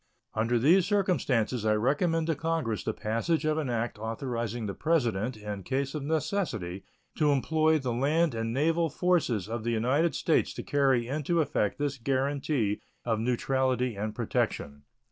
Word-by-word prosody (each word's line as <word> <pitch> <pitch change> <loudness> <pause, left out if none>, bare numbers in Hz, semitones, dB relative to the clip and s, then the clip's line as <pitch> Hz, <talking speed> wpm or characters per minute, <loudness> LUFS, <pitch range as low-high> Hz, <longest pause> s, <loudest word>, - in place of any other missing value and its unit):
Under 115 +2 +1
these 170 +10 +4
circumstances 140 - +1
I 110 -1 +3
recommend 155 +8 +1
to 165 - +1
Congress 155 -8 -2
the - - 0
passage 115 +11 -1
of 155 0 +1
an 145 -5 -2
act 115 -2 -2
authorizing 115 0 -3
the 100 - -3
President, 120 - 0
in 105 -1 -5
case 135 +8 -2
of 150 - -3
necessity, 140 - -2 0.3
to 150 -2 +3
employ 155 +3 +2
the 130 -5 -2
land 150 +5 +2
and 115 0 -2
naval 165 +6 +1
forces 150 - +1
of 115 0 -4
the 120 - -1
United 130 +9 +1
States 160 - +1
to - - -5
carry 135 -4 +2
into 155 +5 0
effect 105 -9 0
this 145 -2 -2
guaranty 135 -3 0 0.2
of 115 -2 0
neutrality 125 0 0
and 105 +2 -4
protection. 70 -7 -2
130 Hz, 160 wpm, -29 LUFS, 115-155 Hz, 0.3 s, these